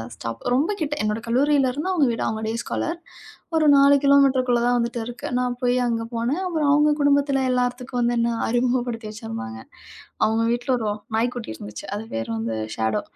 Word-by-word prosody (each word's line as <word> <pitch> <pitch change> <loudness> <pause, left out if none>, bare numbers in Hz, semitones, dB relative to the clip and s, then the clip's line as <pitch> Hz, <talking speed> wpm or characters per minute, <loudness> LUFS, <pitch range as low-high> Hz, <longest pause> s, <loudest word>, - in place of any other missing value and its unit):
Stop 115 -1 -6
ரொம்ப 295 +10 +1
கிட்ட. 295 -2 -1
என்னோட 215 +1 -1
கல்லூரியில 270 +2 +3
இருந்து 295 +7 -3
அவங்க 305 -7 +3
வீடு 230 - -2
அவங்க 220 0 -3
டேஸ்காலர் 235 +8 -3 0.6
ஒரு 315 -1 +3
4 280 0 +6
கிலோமீட்டர்குள்ள 265 -3 +4
தான் 245 0 +3
வந்துட்டு 235 0 -1
இருக்கு. 240 +1 -6
நான் 250 -1 0
போய் 250 0 +2
அங்க 230 -1 -1
போனேன். 240 +9 -1
அப்புறம் 315 -5 0
அவங்க 295 +1 +4
குடும்பத்துல 285 -1 +3
எல்லார்த்துக்கும் 250 0 -1
வந்து 240 0 +2
என்ன 235 0 +2 0.2
அறிமுகப்படுத்தி 240 -1 0
வச்சுருந்தாங்க. 110 - -7 0.7
அவங்க 220 +1 +1
வீட்ல 240 +2 -3
ஒரு 225 - -4
வ் 205 +1 -3 0.2
நாய்க்குட்டி 240 +1 -1
இருந்துச்சு. 105 -1 -9
அது 210 - -4
பேரு 115 0 -3
வந்து 110 0 -3 0.2
ஸேடோ 110 -2 0
245 Hz, 175 wpm, -23 LUFS, 225-275 Hz, 0.7 s, 4